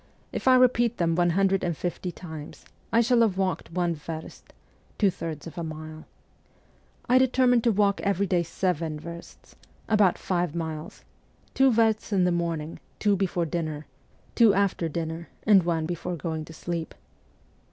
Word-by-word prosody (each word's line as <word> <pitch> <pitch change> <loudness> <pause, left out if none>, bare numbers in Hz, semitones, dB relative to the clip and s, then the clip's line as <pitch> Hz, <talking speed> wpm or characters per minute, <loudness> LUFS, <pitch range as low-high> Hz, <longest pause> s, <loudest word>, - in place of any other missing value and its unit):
If - - -4
I 260 - +7
repeat 240 -2 +3
them 165 -1 +1
one 175 +1 +2
hundred 195 +2 +2
and 170 -4 -1
fifty 180 +1 -3
times, 160 -4 -10 0.3
I 230 - +4
shall 240 0 +3
have 210 -5 +2
walked 190 -3 -1
one 175 0 0
verst 160 +1 -8 0.2
' - - -34
(two 200 -3 +3
thirds 160 -4 -6
of 165 +1 -8
a - - -3
mile). 155 0 -8 1.0
I 255 +1 +5
determined 250 -2 +3
to 235 - +5
walk 200 -1 +2
every 200 0 +1
day 180 -3 +1
seven 165 -2 -2
versts 170 +2 -11 0.3
about 210 -5 +3
five 175 -3 -1
miles: 160 -2 -5 0.5
two 265 0 +4
versts 220 -2 +2
in 190 -3 +3
the 180 - +3
morning, 165 -2 -2 0.2
two 205 -1 +2
before 180 -3 0
dinner, 155 -2 -3 0.5
two 225 -4 +5
after 195 -4 +1
dinner, 165 +1 -4 0.2
and 205 -3 +6
one 165 -2 -1
before 175 +1 -4
going 160 -1 -4
to 160 - -12
sleep. 165 0 -5
175 Hz, 165 wpm, -26 LUFS, 165-200 Hz, 1.0 s, I